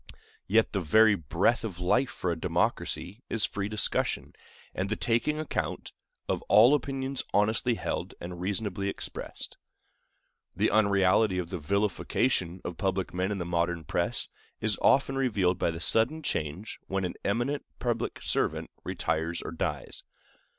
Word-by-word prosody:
Yet 110 Hz, +3 st, +3 dB
the 100 Hz, -, +1 dB
very 110 Hz, +6 st, +5 dB
breath 100 Hz, -, +1 dB
of 95 Hz, -6 st, -5 dB
life 95 Hz, +9 st, +2 dB
for 90 Hz, -, -2 dB
a -, -, 0 dB
democracy 90 Hz, +5 st, -1 dB
is 115 Hz, -, +2 dB
free 100 Hz, 0 st, -3 dB
discussion, 105 Hz, -1 st, 0 dB, 0.4 s
and 95 Hz, +1 st, -2 dB
the 110 Hz, -, 0 dB
taking 120 Hz, +8 st, +1 dB
account, 155 Hz, -, -3 dB, 0.4 s
of -, -, -1 dB
all 110 Hz, +7 st, +7 dB
opinions 135 Hz, -1 st, -1 dB
honestly 110 Hz, +4 st, +2 dB
held -, -, -3 dB
and 90 Hz, 0 st, -7 dB
reasonably 100 Hz, 0 st, -1 dB
expressed. -, -, -5 dB, 1.0 s
The -, -, +2 dB
unreality 100 Hz, -1 st, +3 dB
of 90 Hz, -2 st, -3 dB
the 90 Hz, -, -3 dB
vilification 95 Hz, -, 0 dB
of 85 Hz, -2 st, -5 dB
public 95 Hz, -2 st, -1 dB
men 90 Hz, +2 st, -1 dB
in 100 Hz, -, -1 dB
the 90 Hz, -, -3 dB
modern 85 Hz, -1 st, 0 dB
press -, -, 0 dB, 0.3 s
is 110 Hz, -1 st, +1 dB
often 135 Hz, 0 st, +4 dB
revealed 100 Hz, -9 st, +1 dB
by -, -, +2 dB
the 80 Hz, 0 st, -4 dB
sudden 115 Hz, -, +3 dB
change 80 Hz, -, -3 dB
when 95 Hz, -1 st, -1 dB
an 90 Hz, -, -3 dB
eminent 120 Hz, +8 st, 0 dB
public 120 Hz, -2 st, -2 dB
servant -, -, 0 dB
retires 80 Hz, +2 st, -1 dB
or -, -, -5 dB
dies. 80 Hz, -, -3 dB
100 Hz, 150 wpm, -29 LUFS, 90-115 Hz, 1.0 s, all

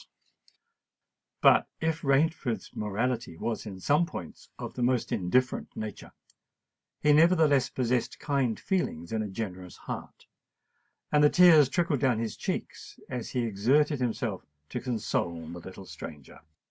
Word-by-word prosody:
But -, -, +6 dB
if 160 Hz, 0 st, -1 dB
Rainford's 140 Hz, -3 st, 0 dB
morality 110 Hz, -2 st, -2 dB
was 115 Hz, +2 st, -3 dB
in 95 Hz, -2 st, -7 dB
some 150 Hz, -, +2 dB
points 85 Hz, -, -9 dB
of -, -, -6 dB
the -, -, -5 dB
most 125 Hz, -1 st, +1 dB
indifferent 125 Hz, +8 st, 0 dB
nature, 110 Hz, -2 st, -6 dB, 0.9 s
he 150 Hz, 0 st, +5 dB
nevertheless 155 Hz, -4 st, +4 dB
possessed 125 Hz, -1 st, -1 dB
kind 135 Hz, -6 st, 0 dB
feelings 145 Hz, -, -2 dB
and 110 Hz, -1 st, -1 dB
a -, -, -4 dB
generous 95 Hz, -3 st, -6 dB
heart; -, -, -8 dB, 0.9 s
and 150 Hz, 0 st, +4 dB
the 150 Hz, -, +7 dB
tears 160 Hz, -6 st, +7 dB
trickled 160 Hz, -1 st, +1 dB
down 130 Hz, -4 st, +2 dB
his 110 Hz, -2 st, -3 dB
cheeks, -, -, -5 dB
as 125 Hz, -3 st, -4 dB
he 125 Hz, -, -1 dB
exerted 130 Hz, +8 st, +2 dB
himself 115 Hz, -5 st, -2 dB, 0.3 s
to -, -, -4 dB
console 100 Hz, -9 st, -2 dB
the 85 Hz, +1 st, -7 dB
little 95 Hz, +2 st, -10 dB
stranger. 75 Hz, -6 st, -10 dB
125 Hz, 135 wpm, -28 LUFS, 105-145 Hz, 0.9 s, the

